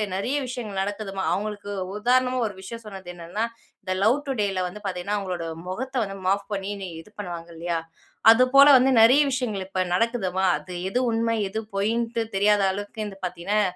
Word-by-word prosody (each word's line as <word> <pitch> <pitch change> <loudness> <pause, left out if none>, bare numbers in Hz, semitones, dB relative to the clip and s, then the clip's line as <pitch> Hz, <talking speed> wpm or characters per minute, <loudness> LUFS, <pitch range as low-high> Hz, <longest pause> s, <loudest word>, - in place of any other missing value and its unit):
நிறைய 240 +9 -1
விஷயங்கள் 225 -6 -4
நடக்குதும்மா! 195 -1 -4
அவுங்களுக்கு 205 0 -4 0.3
உதாரணமா 255 +3 +2
ஒரு 205 - -7
விஷயம் 230 +4 -8
சொன்னது 190 -3 -9
என்னென்னா, 175 +5 -4 0.4
இந்த 185 - -4
லவ் 230 +6 +5
டுடேல 205 -8 0
வந்து 185 +4 -8
பாத்தீங்கன்னா, 185 +2 -2
அவுங்களோட 180 -4 -4 0.2
முகத்த 260 +8 -5
வந்து 195 0 -7
மாப் 200 +1 +1
பண்ணி 195 0 -3 0.3
இது 190 - -18
பண்ணுவாங்க 175 -4 -6
இல்லயா! 170 0 -1 0.5
அது 230 +3 +6
போல 280 +1 +10
வந்து 260 +1 +4
நிறைய 255 +6 +7
விஷயங்கள் 230 -7 -2
இப்ப 190 -1 -1
நடக்குதுமா! 190 -3 +1
அது 185 - -10 0.2
எது 245 - 0
உண்மை. 230 0 +1
எது 220 +3 -3 0.2
பொய்ன்ட்டு 230 +3 0
தெரியாத 205 +1 +4
அளவுக்கு 205 +2 -5
வந்து 195 -2 -8
பார்த்தீங்கன்னா, 185 +4 0
205 Hz, 165 wpm, -25 LUFS, 190-230 Hz, 0.5 s, போல